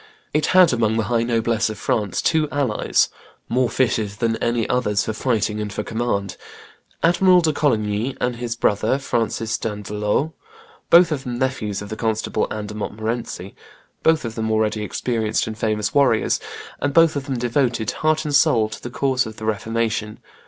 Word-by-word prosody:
It 150 0 +1
had 185 -5 +6
amongst 110 -2 +1
the 110 - +1
high 115 +2 +1
noblesse 115 -1 +1
of 110 - -6
France 105 -3 -1
two 155 -2 +2
allies, 135 -8 +1 0.4
more 125 +1 +1
fitted 115 -5 +1
than 115 +1 0
any 115 -1 0
others 105 -5 +1
for 110 - -2
fighting 110 -3 0
and 105 -1 -4
for 105 - -3
command, 110 -4 -2 0.7
Admiral 180 +2 +5
de 160 -2 +1
Coligny 110 -3 0
and 125 -1 -1
his 120 -1 -3
brother, 110 +3 +1
Francis 115 -3 -1
d'Andelot, 105 +6 -2 0.6
both 170 0 +7
of 140 -3 -2
them 125 -2 -4
nephews 110 -6 -2
of 105 - -9
the 110 - -4
Constable 110 -1 -1
Anne 105 -1 -4
de 105 - -7
Montmorency, 110 -2 -4 0.5
both 160 -4 +3
of 115 - -4
them 110 -1 -2
already 110 0 +1
experienced 110 0 -1
and 110 - -5
famous 105 -1 -1
warriors, 135 -6 +3 0.4
and 145 -1 -1
both 165 -2 +5
of 140 0 -4
them 135 -3 -2
devoted, 120 -2 0
heart 155 0 0
and 150 - -2
soul, 115 -6 +4
to 110 - -8
the 120 - -6
cause 130 -1 0
of 110 - -8
the 110 - -6
Reformation. 110 0 -1
115 Hz, 175 wpm, -21 LUFS, 110-130 Hz, 0.7 s, both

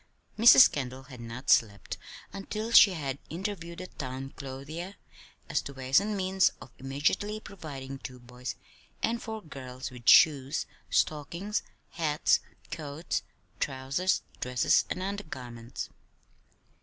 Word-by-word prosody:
Mrs. 235 +3 +9
Kendall 130 -2 -4
had 130 -1 -12
not 115 +3 -2
slept 100 -3 +2 0.3
until 215 +3 -4
she 210 -4 +9
had 140 -5 -3
interviewed 170 -1 -5
the 185 - -6
town 135 -4 -6
clothier 150 +8 -7 0.5
as - - 0
to 140 - -8
ways 130 +2 +3
and 205 +1 -2
means 190 0 +3
of - - -12
immediately 160 +11 0
providing 140 -10 -8
two 125 -1 -8
boys 125 +1 -7 0.5
and 235 +1 +1
four 220 -1 -6
girls 130 -4 -7
with 120 -2 0
shoes, 145 -3 +6 0.2
stockings, 170 +8 0 0.3
hats, 155 -3 +2 0.3
coats, 155 +1 -3 0.4
trousers, 135 +8 0 0.2
dresses, 125 -1 +3
and 185 - -3
undergarments. 130 - -6
145 Hz, 120 wpm, -29 LUFS, 130-185 Hz, 0.5 s, Mrs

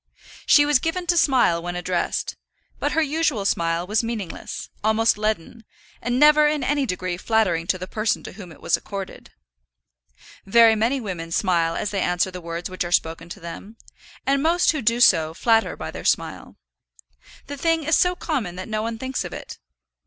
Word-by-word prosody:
She 290 -2 +6
was 295 -3 +3
given 350 +4 -2
to 350 0 +2
smile 255 - +3
when 175 +1 -5
addressed, 180 0 -2 0.4
but - - -1
her 320 - +2
usual 295 -8 0
smile 170 -2 0
was 210 +3 +1
meaningless, 225 -6 -5 0.2
almost 220 +1 +3
leaden, 215 +1 -3 0.4
and 240 +1 -1
never 300 0 +6
in 295 -2 0
any 280 0 0
degree 180 -2 -3
flattering 185 -5 +1
to 185 - +1
the 185 - -6
person 215 +3 -1
to - - -8
whom 185 -3 -11
it 160 - -15
was - - +2
accorded. 195 -2 -8 1.1
Very 230 +3 +6
many 230 +5 +1
women 175 -7 -6
smile 170 -2 +1
as 210 - -2
they 200 -2 -1
answer 180 +1 0
the 180 0 -8
words 170 +1 -5
which 185 -1 -3
are 175 - -6
spoken 165 0 0
to 200 - -8
them, 195 +6 -9 0.5
and 275 0 +2
most 335 +3 +3
who 310 -3 -3
do 235 +1 +1
so 160 -7 +4
flatter 225 +3 +2
by - - -6
their - - -8
smile. - - -1 0.9
The 285 - -6
thing 325 +2 0
is 320 +2 +2
so 360 0 +3
common 260 - -3
that 185 +1 -7
no 215 -1 -2
one 225 +1 -3
thinks 260 +2 -3
of - - -7
it. - - -9
215 Hz, 190 wpm, -23 LUFS, 180-275 Hz, 1.1 s, She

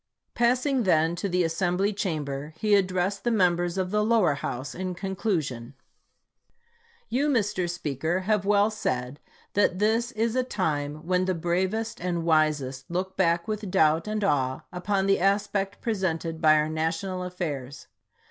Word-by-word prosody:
Passing 250 +3 +2
then 165 -4 +2
to 200 - -2
the 180 0 +2
Assembly 180 +4 0
Chamber, 150 -6 -3
he 210 +3 +3
ad 195 -2 +3
dressed 185 +2 -1
the 240 - +1
members 175 -4 +2
of 185 -1 -1
the 210 0 +2
lower 220 -8 +3
house 130 -1 -5
in 185 0 -4
con 190 +1 -4
clusion:... 145 - -2 1.3
You, 285 +4 +1
Mr. 205 -8 0
Speaker, 160 +1 -2
have 210 +1 +1
well 205 +1 +3
said 130 -8 -3 0.3
that 190 -3 +2
this 225 +4 +1
is 225 +1 0
a 255 - +3
time 155 - -2
when 185 +1 +1
the 185 -1 0
bravest 185 +7 -1
and 175 -2 -1
wisest 150 -5 +1
look 185 +2 -3
back 170 0 +1
with 215 -2 -3
doubt 160 -1 +3
and 215 0 -2
awe 130 -8 +1
upon 190 +2 -1
the 195 0 +3
aspect 195 +1 0
presented 170 -7 -2
by 155 -1 +6
our 150 0 +2
national 165 +4 -2
af 180 0 -6
fairs. 140 -6 -5
180 Hz, 160 wpm, -26 LUFS, 160-205 Hz, 1.3 s, by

